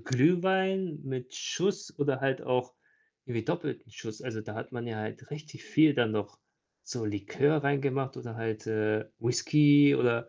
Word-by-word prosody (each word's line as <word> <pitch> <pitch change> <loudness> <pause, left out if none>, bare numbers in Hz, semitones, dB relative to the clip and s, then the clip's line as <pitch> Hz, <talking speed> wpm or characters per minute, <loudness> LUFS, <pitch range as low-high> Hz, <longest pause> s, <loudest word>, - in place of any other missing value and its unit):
Glühwein 180 +4 +2
mit 130 -2 -5
Schuss 195 +3 -1
oder 140 -2 +1
halt 135 -1 0
auch 125 0 -1 0.5
irgendwie 115 -3 -3
doppelten 140 -5 -3
Schuss. 110 0 -9
Also, 115 -4 -4
da 105 0 -8
hat 115 +3 -7
man 120 -1 -5
ja 115 -2 -4
halt 110 +6 -7
richtig 150 0 -9
viel 155 -1 +5
dann 120 -4 +2
noch 105 -1 -3 0.4
so 120 -3 -5
Likör 130 +9 +1
reingemacht 140 -1 0
oder 115 -2 -7
halt, 110 -2 -4
äh, 110 -1 0
Whiskey 145 +4 +5
oder 115 -1 +1
130 Hz, 160 wpm, -30 LUFS, 115-145 Hz, 0.5 s, viel